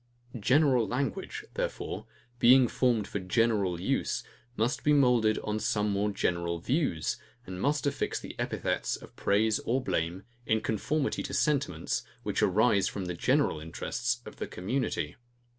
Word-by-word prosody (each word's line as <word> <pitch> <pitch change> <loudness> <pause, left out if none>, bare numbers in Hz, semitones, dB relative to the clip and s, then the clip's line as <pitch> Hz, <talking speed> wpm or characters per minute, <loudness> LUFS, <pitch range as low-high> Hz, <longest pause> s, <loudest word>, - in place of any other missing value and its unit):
General 130 0 +4
language, 190 - -3
therefore, - - -4 0.3
being 125 +1 +7
formed 115 -4 +1
for 100 - -3
general 100 -2 +1
use, - - -1 0.3
must 115 +6 0
be 150 - +4
moulded 125 -6 +4
on 105 0 -1
some 105 0 0
more 100 +1 +1
general 85 -3 -1
views, 120 - 0 0.3
and 90 0 -6
must 145 +1 +1
affix 140 0 -1
the - - -8
epithets - - -1
of - - -13
praise 105 +2 +2
or 125 +3 0
blame, 85 -6 -2 0.2
in 110 - +3
conformity 135 +8 -1
to - - -4
sentiments, 140 -2 0 0.2
which - - -1
arise 100 0 +3
from 100 -3 -4
the 90 - -3
general 130 - +2
interests 120 +9 -3
of - - -10
the - - -4
community. 120 +9 -2
110 Hz, 145 wpm, -29 LUFS, 100-135 Hz, 0.3 s, being